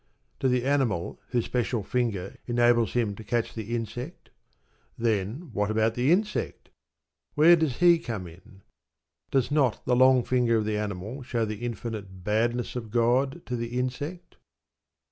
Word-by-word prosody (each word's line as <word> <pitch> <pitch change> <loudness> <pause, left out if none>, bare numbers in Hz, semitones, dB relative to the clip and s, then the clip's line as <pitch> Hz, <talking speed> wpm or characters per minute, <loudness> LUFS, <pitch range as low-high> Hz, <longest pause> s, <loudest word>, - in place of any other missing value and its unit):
To 135 - +1
the 125 0 +1
animal 130 -11 0
whose 120 -2 0
special 120 -3 -1
finger 100 -5 -2
enables 120 -1 +3
him 115 -4 +1
to 110 - -9
catch 115 +2 -1
the 115 +1 -4
insect? 120 +7 -6 0.7
Then 115 - -1
what 105 0 0
about 110 +1 +2
the 125 +5 +1
insect? 210 +4 -1 0.6
Where 160 +3 +7
does 160 -7 -1
he 175 -1 +6
come 115 - -5
in? 95 +4 -15 0.7
Does 135 0 +1
not 140 -6 +1
the 125 - +2
long 130 0 +5
finger 120 -2 +2
of 110 - 0
the 110 0 -1
animal 105 +5 -4
show 120 -2 -1
the 105 0 -4
infinite 105 -5 -5
badness 115 +5 0
of 115 -3 -5
God 125 +7 +1
to 125 - -3
the 120 +1 -4
insect? 145 +8 -4
120 Hz, 155 wpm, -27 LUFS, 110-130 Hz, 0.7 s, Where